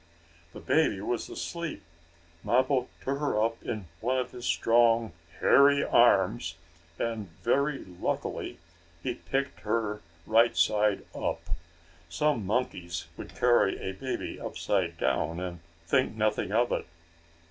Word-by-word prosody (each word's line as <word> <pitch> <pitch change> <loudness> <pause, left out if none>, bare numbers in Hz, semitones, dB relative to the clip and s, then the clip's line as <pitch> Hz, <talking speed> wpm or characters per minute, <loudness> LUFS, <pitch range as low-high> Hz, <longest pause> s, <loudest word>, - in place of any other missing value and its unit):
The - - -8
baby 155 -11 +2
was 115 +4 -2
asleep. 170 -1 -5 0.6
Mappo 130 +1 +2 0.2
took 140 +1 -1
her 145 -7 0
up 115 +1 0
in 105 -4 -4
one 125 +3 0
of 130 - -2
his 125 0 -6
strong 115 -1 +3 0.3
hairy 140 0 +6
arms, 95 -6 +3 0.4
and, 115 -4 -3
very 140 +4 +1
luckily 90 -2 -3 0.5
he 125 - -1
picked 135 +3 -3
her 105 -1 -1 0.2
right 115 +2 +4
side 105 -1 +2
up. - - -2 0.7
Some 115 - 0
monkeys 90 -8 -2
would - - -9
carry 120 -5 +3
a 95 - -3
baby 130 +8 -4
upside 90 -5 -1
down, 85 0 0
and 90 -1 -5 0.3
think 130 +3 +2
nothing 110 -3 0
of 120 +3 +2
it. - - -1
115 Hz, 125 wpm, -29 LUFS, 100-130 Hz, 0.7 s, hairy